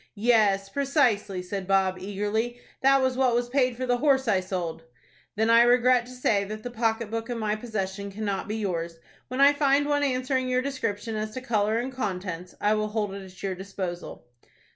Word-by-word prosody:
"Yes, 205 Hz, -3 st, +3 dB
precisely," 235 Hz, -, +1 dB
said 185 Hz, 0 st, -5 dB
Bob, 190 Hz, -1 st, +2 dB
eagerly. 210 Hz, +5 st, -2 dB, 0.2 s
"That 270 Hz, 0 st, +5 dB
was 260 Hz, -1 st, +1 dB
what 255 Hz, -2 st, +2 dB
was 240 Hz, 0 st, 0 dB
paid 255 Hz, -2 st, +1 dB
for 255 Hz, -, -2 dB
the 245 Hz, -1 st, +1 dB
horse 270 Hz, -1 st, +2 dB
I 200 Hz, -4 st, +3 dB
sold." 180 Hz, -3 st, -4 dB, 0.5 s
"Then 220 Hz, +2 st, +2 dB
I 230 Hz, 0 st, +7 dB
regret 245 Hz, 0 st, +4 dB
to -, -, -11 dB
say 220 Hz, -5 st, +1 dB
that 215 Hz, +2 st, -7 dB
the 245 Hz, -, -5 dB
pocket 225 Hz, -1 st, -1 dB
book 230 Hz, +1 st, -3 dB
in 240 Hz, -, -2 dB
my 215 Hz, -1 st, 0 dB
possession 200 Hz, -3 st, -4 dB
cannot 200 Hz, -1 st, -3 dB
be 210 Hz, -, -3 dB
yours. 170 Hz, -6 st, -3 dB, 0.3 s
When 255 Hz, +1 st, -5 dB
I 280 Hz, +1 st, +7 dB
find 285 Hz, 0 st, +3 dB
one 290 Hz, 0 st, +1 dB
answering 255 Hz, -1 st, 0 dB
your 255 Hz, 0 st, +1 dB
description 230 Hz, -5 st, -3 dB
as 215 Hz, 0 st, -2 dB
to 255 Hz, -, -4 dB
color 215 Hz, -3 st, +1 dB
and 250 Hz, +3 st, -2 dB
contents, 185 Hz, -7 st, -4 dB
I 210 Hz, +1 st, +2 dB
will 215 Hz, 0 st, 0 dB
hold 210 Hz, -2 st, -2 dB
it 200 Hz, 0 st, -7 dB
at 185 Hz, 0 st, -13 dB
your 195 Hz, -1 st, -1 dB
disposal." 185 Hz, -5 st, -6 dB
220 Hz, 200 wpm, -26 LUFS, 195-250 Hz, 0.5 s, I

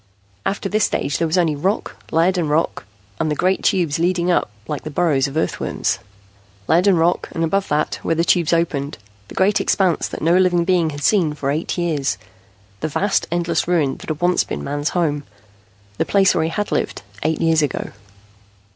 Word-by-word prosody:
After 200 Hz, 0 st, -2 dB
this 210 Hz, +1 st, +1 dB
stage 140 Hz, -1 st, -1 dB
there 165 Hz, -, +1 dB
was 160 Hz, +4 st, 0 dB
only 165 Hz, -4 st, +2 dB
rock, 190 Hz, +9 st, -1 dB
lead 170 Hz, +4 st, +2 dB
and 170 Hz, -4 st, 0 dB
rock, 150 Hz, -8 st, 0 dB, 0.3 s
and 155 Hz, -, 0 dB
the 150 Hz, -, 0 dB
great 185 Hz, +5 st, +1 dB
tubes 165 Hz, -4 st, +1 dB
leading 175 Hz, +1 st, +1 dB
up 175 Hz, -, +1 dB, 0.2 s
like 150 Hz, -2 st, -3 dB
the -, -, -5 dB
burrows 145 Hz, -3 st, +1 dB
of 140 Hz, +3 st, -5 dB
earthworms. 160 Hz, -, -1 dB, 0.7 s
Lead 175 Hz, +4 st, +3 dB
and 190 Hz, -3 st, +5 dB
rock, 170 Hz, +2 st, +1 dB
and 165 Hz, -, -1 dB
above 195 Hz, +4 st, 0 dB
that, 150 Hz, +1 st, 0 dB
where 165 Hz, -, 0 dB
the 165 Hz, -, +2 dB
tubes 170 Hz, -2 st, +2 dB
opened, 155 Hz, -4 st, 0 dB, 0.3 s
the -, -, -11 dB
great 195 Hz, +2 st, +3 dB
expanse 185 Hz, -4 st, +1 dB
that -, -, -7 dB
no 165 Hz, +2 st, +4 dB
living 180 Hz, -2 st, +3 dB
being 175 Hz, -3 st, +2 dB
had 145 Hz, -1 st, -7 dB
seen 170 Hz, -8 st, +2 dB
for 140 Hz, -2 st, -1 dB
eight 155 Hz, +5 st, -2 dB
years, 155 Hz, -6 st, 0 dB, 0.6 s
the 155 Hz, -, -2 dB
vast, 195 Hz, +7 st, 0 dB
endless 170 Hz, -1 st, 0 dB
ruin 160 Hz, -7 st, +1 dB
that -, -, -10 dB
had 155 Hz, 0 st, -3 dB
once 180 Hz, +1 st, +3 dB
been -, -, -5 dB
Man's 145 Hz, +1 st, -2 dB
home, 150 Hz, -4 st, 0 dB, 0.8 s
the -, -, +4 dB
place 195 Hz, -1 st, +3 dB
where 160 Hz, -, +1 dB
he -, -, -1 dB
had 205 Hz, +5 st, -3 dB
lived, -, -, -2 dB, 0.2 s
eight 160 Hz, +1 st, 0 dB
years 165 Hz, -1 st, +3 dB
ago. 145 Hz, -4 st, -2 dB
165 Hz, 200 wpm, -20 LUFS, 150-180 Hz, 0.8 s, and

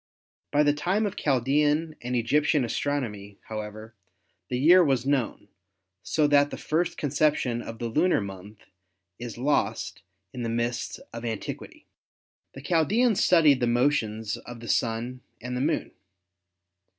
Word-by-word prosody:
By 145 Hz, +1 st, +4 dB
the 145 Hz, -1 st, +3 dB
time 180 Hz, +9 st, 0 dB
of 205 Hz, -1 st, -3 dB
Chaldean 150 Hz, +4 st, +1 dB
and 125 Hz, +1 st, -3 dB
Egyptian 145 Hz, +4 st, +2 dB
astronomy, 110 Hz, -6 st, -3 dB
however, 110 Hz, +1 st, -7 dB, 0.6 s
the 125 Hz, -, -1 dB
year 175 Hz, +7 st, +6 dB
was 135 Hz, -5 st, +1 dB
known, 135 Hz, -7 st, -1 dB, 0.5 s
so 155 Hz, -, +1 dB
that 145 Hz, 0 st, +4 dB
the -, -, -6 dB
first 165 Hz, +2 st, -1 dB
conception 145 Hz, -4 st, +1 dB
of 115 Hz, -1 st, -8 dB
the 120 Hz, -, -4 dB
lunar 160 Hz, +10 st, +2 dB
month 100 Hz, +1 st, -9 dB, 0.5 s
is 120 Hz, -1 st, -7 dB
lost 145 Hz, +4 st, -1 dB, 0.3 s
in 125 Hz, -, -6 dB
the 115 Hz, -, -2 dB
mists 120 Hz, +1 st, -2 dB, 0.2 s
of 115 Hz, 0 st, -7 dB
antiquity. 110 Hz, -3 st, -6 dB, 0.7 s
The 135 Hz, -, -8 dB
Chaldeans 200 Hz, -, +2 dB
studied 155 Hz, -6 st, +5 dB
the 120 Hz, -, +1 dB
motions 115 Hz, -4 st, 0 dB
of 120 Hz, -1 st, -10 dB
the 115 Hz, -, -9 dB
Sun 120 Hz, +3 st, -1 dB, 0.2 s
and 125 Hz, +1 st, -5 dB
the 125 Hz, -, -2 dB
Moon. 150 Hz, +4 st, -1 dB
130 Hz, 140 wpm, -26 LUFS, 115-150 Hz, 0.7 s, year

